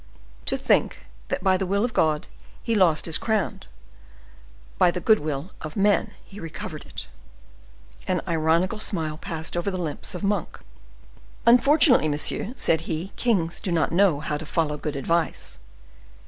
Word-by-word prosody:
"To - - +2
think 65 - +1 0.2
that - - -3
by 190 -1 +3
the 190 - -2
will 200 +4 +1
of 240 - -4
God 155 -2 +1 0.4
he 230 - -1
lost 180 -7 +3
his 165 - +5
crown, 220 -2 -1 1.2
by - - +6
the 175 - -2
good 220 -3 +4
will 150 +4 -4
of 155 -1 -7
men 205 +1 +2
he 205 - -12
recovered 165 -2 -7
it." - - -8 1.0
An - - +1
ironical 170 +6 +1
smile 160 -8 -1
passed 160 -1 -4
over 175 +3 -1
the 185 - -3
lips 170 +2 -3
of 180 - -6
Monk. 200 -3 -1 0.9
"Unfortunately, 250 - +5
monsieur," 150 +8 0
said 160 - 0
he, 170 +5 -3
"kings 185 -9 0
do 190 - -4
not 165 -2 +1
know 170 -4 +3
how 150 0 -2
to 155 - -8
follow 150 -2 0
good 150 0 -4
advice." 165 +4 -2
170 Hz, 160 wpm, -24 LUFS, 155-200 Hz, 1.2 s, by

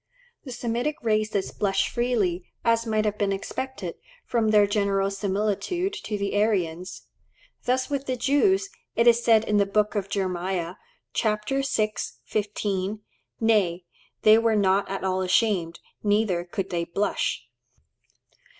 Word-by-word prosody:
The 260 - -7
Semitic 240 +5 -2
races 215 -3 0
blush 195 -1 +1
freely, 215 -8 0 0.2
as 230 0 +2
might 215 -1 +1
have 210 0 -1
been 200 -1 +1
expected, 260 +7 -4 0.3
from 230 -2 +1
their 210 -1 +6
general 200 -1 +1
similitude 210 - -1
to 210 - -2
the 200 0 -2
Aryans. 185 -5 -1 0.6
Thus 255 +1 +1
with 280 -1 -3
the 255 - 0
Jews, 380 - +3 0.3
it 235 - +3
is 235 0 +5
said 225 -1 +5
in 210 -1 +1
the 200 -1 +3
Book 210 +1 +1
of 200 -2 -2
Jeremiah 185 -2 -2 0.4
(chap. 215 -1 0
vi. 270 +2 0 0.6
15), 205 -1 -2 0.4
"Nay, 200 -6 +2 0.4
they 215 +1 +7
were 230 -1 +2
not 195 -1 +2
at 195 -1 -4
all 190 0 0
ashamed, 185 -3 +1 0.2
neither 205 -4 +1
could 190 +2 -4
they 170 -1 0
blush." 195 +5 -1
210 Hz, 140 wpm, -25 LUFS, 195-230 Hz, 0.6 s, they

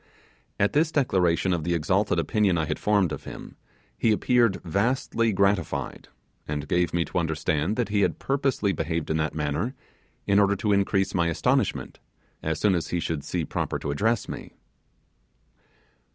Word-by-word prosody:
At 100 - +2
this 155 +2 +2
declaration 95 - +2
of 85 -3 -1
the 85 +1 0
exalted 95 +4 +1
opinion 95 +3 +2
I 80 - 0
had - - -3
formed 100 -5 +2
of - - -6
him, - - -9 0.4
he 115 - +2
appeared 115 -1 +2
vastly 115 +5 0
gratified, 100 -3 0 0.4
and 75 0 -3
gave 90 +3 +1
me 85 -1 0
to - - -2
understand 80 +2 -1
that 120 -2 -1
he 100 0 +1
had - - +1
purposely 135 -7 0
behaved 80 -1 -2
in 80 - +1
that 80 0 -1
manner, 75 - -2 0.5
in 100 0 +4
order 100 0 +3
to 105 +1 0
increase 100 0 +1
my 85 -2 +2
astonishment, 85 - 0 0.4
as 80 -1 -2
soon 105 -2 +3
as 85 -3 -1
he 90 - -1
should 80 -3 -3
see - - -2
proper - - -2
to - - -4
address 110 +9 0
me. - - -8
95 Hz, 165 wpm, -26 LUFS, 80-105 Hz, 0.5 s, in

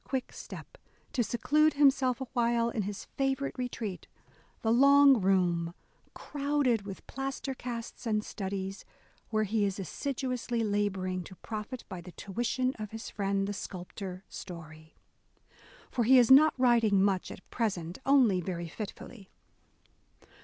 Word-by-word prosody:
BROWNING 265 -1 -1
quick - - -22
step, - - -10 0.4
to 245 - +2
seclude 300 +7 +2
himself 270 -3 +3
awhile 235 -2 +1
in 225 - -1
his 200 0 -5
favourite 270 0 0
retreat, 235 -6 -4 0.3
— - - -33
the 225 0 +3
"long 280 -1 +7
room," 175 -3 +1 0.4
crowded 280 -7 0
with 195 - -8
plaster 270 +1 -4
casts 240 -1 -6
and 215 -1 +1
studies, 195 -1 -4 0.5
where 215 -1 +1
he 215 +1 0
is 195 -1 0
assid 240 - -4
uously 240 -2 -1
labouring 190 -3 -1
to 185 - -11
profit 220 +5 -6
by 185 -2 -7
the 175 0 -11
tuition 245 +5 -1
of 215 -1 -5
his 225 +1 -7
friend 195 -1 0
the 205 - -2
sculptor 185 0 -7
Story. 160 -3 -10 1.0
For 240 - +1
he 260 +4 +7
is 245 0 +6
not 305 +4 +8
writing 230 -6 +4
much 195 -2 +1
at - - -11
present; 185 -7 -2
only 250 -10 +4
very 175 -1 -4
fitfully. 205 +1 -8
220 Hz, 145 wpm, -30 LUFS, 190-255 Hz, 1.0 s, not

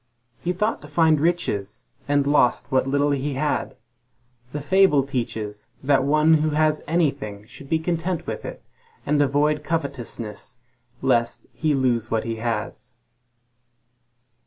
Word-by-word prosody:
He 175 - +1
thought 210 +5 -1
to 145 - -11
find 155 0 +3
riches, 145 - -1 0.2
and 145 -1 +2
lost 140 -4 +2
the 130 0 +4
little 140 +2 +1
he 140 0 -1
had. 150 +2 -1 0.8
The 150 - -3
fable 165 -2 +4
teaches 110 -6 -4 0.2
that 135 -1 +3
one 155 +3 +4
who 155 - +1
has 155 -1 +2
anything 140 -11 -1
should 135 +5 -13
be 160 - +3
content 170 +1 -2
with - - -5
it, - - -8 0.4
and 150 -1 +2
avoid 145 +2 +2
covetousness, 125 -8 -4 0.5
lest 120 -3 +1
he 155 -2 0
lose 120 -4 +1
what 115 -1 0
he 115 -1 -3
has. 115 0 -4
145 Hz, 135 wpm, -23 LUFS, 120-155 Hz, 0.8 s, the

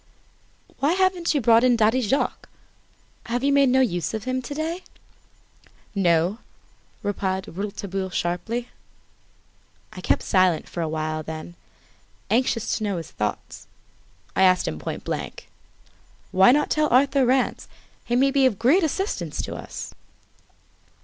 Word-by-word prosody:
"Why 290 +4 +2
haven't 370 -3 +1
you 285 - +2
brought 230 0 +5
in 250 -1 +5
Daddy 225 +3 +3
Jacques? 255 +5 -1 0.8
Have 245 +2 -2
you 280 0 +3
made 280 -2 +5
no 260 +1 +4
use 175 - -1
of 220 - -5
him 255 +1 -2
to 270 +3 -7
day?" 325 +4 -3 1.1
"No," 180 +1 +2 0.6
replied 190 -1 -2
Rouletabille 195 0 -4
sharply. 220 +8 -2 1.2
I - - -8
kept - - +1
silence 185 -4 +2
for 170 - -5
awhile, 155 -1 -2
then, 160 +2 -7 0.8
anxious 235 -1 +1
to - - -4
know 200 -3 -1
his 165 - -7
thoughts, 105 -1 -5 0.7
I - - +2
asked 185 -1 +4
him 80 -1 -3
point - - -5
blank: - - -5 0.8
"Why 190 +4 +6
not 295 +3 +2
tell 305 -1 +2
Arthur 275 +2 +4
Rance? 255 +1 +1 0.4
He 240 - -1
may 270 +2 +3
be 270 -1 +4
of 220 -6 -2
great 265 - +4
assistance 385 +6 -2
to - - -5
us?" - - -8
230 Hz, 140 wpm, -24 LUFS, 185-270 Hz, 1.2 s, Why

